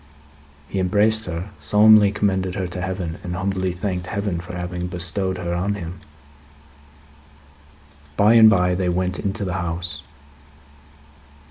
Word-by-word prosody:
He 95 - -3
embraced 105 +4 +2
her, 90 +3 -5
solemnly 105 +6 +5
commended 95 -3 -1
her 95 - -2
to 90 +1 -5
Heaven, 90 -2 -4
and 90 -1 -4
humbly 95 0 -1
thanked 90 0 -4
Heaven 100 -4 -2
for 85 +1 -8
having 90 0 -4
bestowed 90 +2 -2
her 85 -1 -3
on 95 +4 -1
him. 90 -2 -7 2.2
By 105 +2 +5
and 110 -1 +8
bye, 90 -3 +3
they 90 0 0
went 90 +1 -1
into 100 +1 -3
the 90 - -3
house. 85 0 -4
95 Hz, 135 wpm, -22 LUFS, 90-100 Hz, 2.2 s, and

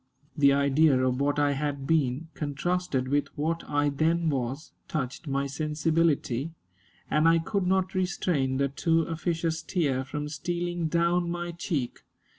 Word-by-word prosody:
The 140 -1 +5
idea 140 +1 +4
of 130 +1 0
what 145 +1 +1
I 145 -1 +3
had 140 -1 -2
been, 155 0 +1
contrasted 145 -2 -1
with 145 +2 +1
what 165 +3 -1
I 145 0 +2
then 160 +3 +1
was, 135 +3 -3 0.2
touched 135 0 -4
my 140 0 0
sensibility, 155 -1 0 0.6
and 155 +2 +4
I 165 - +5
could 180 +3 -1
not 190 0 +1
restrain 180 -8 0
the 140 0 +2
too 165 +4 +1
officious 165 0 -2
tear 145 -7 0
from 150 +2 -4
stealing 175 +3 -2
down 170 +2 +1
my 175 0 -3
cheek. 165 -7 -3
155 Hz, 145 wpm, -27 LUFS, 140-170 Hz, 0.6 s, The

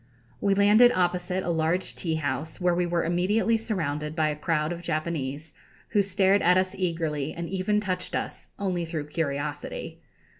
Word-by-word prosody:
We 200 -1 +2
landed 210 +5 +6
opposite 180 +1 0
a 175 - -1
large 165 +3 0
teahouse, 155 -2 -2
where 180 -1 +2
we 175 0 +1
were 170 -1 0
immediately 190 +7 +2
surrounded 155 -9 -2
by 155 -2 +2
a 150 - -2
crowd 155 0 0
of 175 0 -5
Japanese, 155 -3 -3 0.4
who 205 - +3
stared 195 0 +3
at 180 +2 +5
us 185 0 +1
eagerly 165 -5 -2
and 170 0 -4
even 195 +3 0
touched 185 -3 -3
us, - - -4
only 185 -3 -1
through 160 -3 -4
curiosity. 150 - -3
175 Hz, 160 wpm, -27 LUFS, 155-190 Hz, 0.4 s, landed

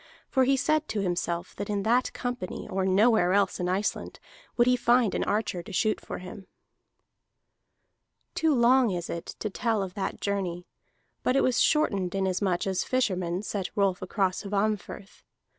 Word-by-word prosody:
For 260 -1 +3
he 270 +1 +3
said 310 +3 +1
to 210 - -2
himself 175 -1 -2
that 205 - -5
in 200 -1 -1
that 240 +4 +2
company 245 -6 -5
or 190 0 -1
nowhere 195 -1 +4
else 200 0 +2
in 180 0 -1
Iceland 195 +3 -2 0.4
would 240 - +5
he 250 0 +4
find 240 -3 +3
an - - 0
archer 205 -4 -1
to 170 - -11
shoot 215 +3 0
for - - -6
him. 185 +1 -10 1.9
Too 320 -4 +2
long 245 0 +4
is 175 -3 -3
it 170 - -5
to 215 - -4
tell 225 -2 0
of 185 -2 -6
that 195 -1 -4
journey, 185 -4 -2 0.6
but 255 - +1
it - - +3
was 255 - +2
shortened 200 - +2
inasmuch 190 -1 0
as 190 -2 0
fishermen 185 -7 -1
set 200 -3 -3
Rolf 195 -3 +1
across 185 0 -1
Hvammfirth. 205 -1 -3
200 Hz, 165 wpm, -27 LUFS, 185-240 Hz, 1.9 s, would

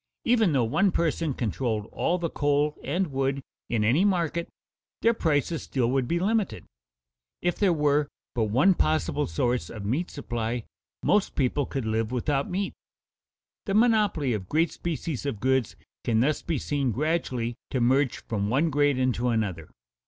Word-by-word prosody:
Even 225 -6 +4
though 135 -4 +2
one 155 - +2
person 165 -4 0
controlled 110 -2 -1
all 175 - 0
the 170 -1 -1
coal 145 +1 +1
and 180 -3 -1
wood 135 0 -1 0.3
in 115 -3 +1
any 130 - +3
market, 170 -4 0 0.5
their 230 - +5
prices 160 - 0
still 125 -3 0
would 130 -2 +1
be 170 - +1
limited. 210 +3 0 0.7
If 175 0 -1
there 200 -3 +4
were 150 -2 +2 0.3
but 115 -3 +1
one 130 - +4
possible 155 -2 0
source 120 +9 -1
of 105 -3 -7
meat 140 - -1
supply, 120 -4 -3 0.4
most 210 - +2
people 135 +1 +1
could 135 -5 -3
live 110 +1 -1
without 135 +3 0
meat. 195 +2 -2 0.9
The 195 - 0
monopoly 210 - +3
of 95 -4 -4
great 165 +3 +2
species 165 -4 -4
of 115 -7 -3
goods 130 -1 +1 0.3
can 110 -2 +2
thus 145 +6 +1
be 165 -3 -2
seen 140 -2 -1
gradually 130 -4 -1 0.2
to 130 - -1
merge 130 +2 +2
from 105 -3 -1
one 145 +7 +2
grade 145 -1 +2
into 125 -1 +1
another. 100 -9 -1
140 Hz, 160 wpm, -26 LUFS, 120-170 Hz, 0.9 s, their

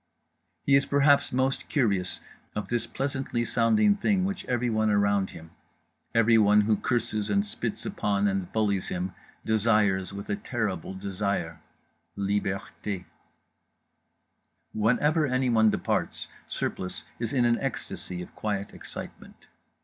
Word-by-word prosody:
He 140 - +5
is 140 - +3
perhaps 140 0 +4
most 130 +1 0
curious 100 - 0 0.3
of 105 - -3
this 120 -1 0
pleasantly 135 -3 -2
sounding 205 - +3
thing 200 -2 +1
which 195 -1 -3
everyone 115 -3 +1
around 100 -1 +2
him, 80 0 -12 0.6
everyone 110 -2 +5
who 105 +1 +3
curses 110 -2 -1
and 100 0 +2
spits - - -3
upon 100 0 0
and 95 -2 -1
bullies 100 -4 0
him, 90 +1 -3 0.3
desires 105 -4 +2
with 100 0 -7
a - - +1
terrible 100 -5 -3
desire— 95 -4 -3 0.6
Liberté. 100 -1 -2 1.7
Whenever 145 +8 +2
anyone 125 -4 +3
departs - - -1 0.2
Surplice 90 0 -3 0.2
is 115 -2 -2
in 125 -3 +2
an 120 0 +3
ecstasy 90 -9 -4
of - - -13
quiet 100 -2 -3
excitement. - - -10
110 Hz, 120 wpm, -27 LUFS, 100-125 Hz, 1.7 s, He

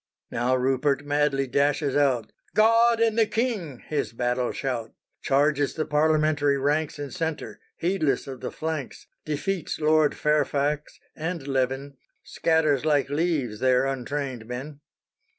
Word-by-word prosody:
Now 125 +2 +1
Rupert 135 +2 +1
madly 145 -1 +1
dashes 140 +2 +1
out, 130 -6 +2 0.2
"God 230 +2 +5
and 230 0 +2
the 220 - +4
King!" 210 - -2
his 150 -5 -2
battle 125 +1 0
shout; 120 -5 -3 0.3
Charges 145 +1 +2
the 155 - -1
parliamentary 150 -1 +2
ranks 145 +3 0
In 145 -1 -6
centre, 160 -3 -4 0.2
heedless 165 -7 0
of 130 -2 -8
the - - -3
flanks, 155 -4 -5 0.2
Defeats 155 +3 -2
Lord 155 -1 +3
Fairfax 150 0 0 0.2
and 160 -2 -4
Leven, 135 +1 -1 0.3
Scatters 155 -4 +1
like 145 -3 +1
leaves 145 -8 0
their 130 0 +3
untrained 135 -2 -3
men. 135 +4 -6
145 Hz, 130 wpm, -25 LUFS, 135-155 Hz, 0.3 s, God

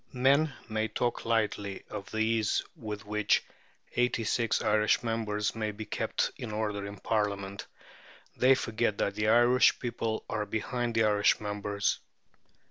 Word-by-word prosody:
Men 140 +4 +3 0.2
may 110 -1 -1
talk 120 +3 -2
lightly 105 -3 -1
of 100 -2 -6
the 110 - -5
ease 110 -1 +1
with 105 -2 -6
which 105 0 +2 0.5
eighty 120 -1 +1
six 115 +1 +1
Irish 105 +2 +2
members 110 -2 -1
may 110 -1 -2
be 105 +1 -6
kept - - -1
in 115 - -6
order 105 -2 -2
in 100 0 -8
Parliament. 100 -2 -2 0.7
They 130 +1 +5
forget 115 -4 -1
that 100 - 0
the 105 +1 -1
Irish 120 +3 +5
people 115 -2 -3
are 105 -2 -2
behind 120 +2 -2
the 115 - +4
Irish 105 -1 +3
members. 105 -1 -1
110 Hz, 145 wpm, -30 LUFS, 105-115 Hz, 0.7 s, They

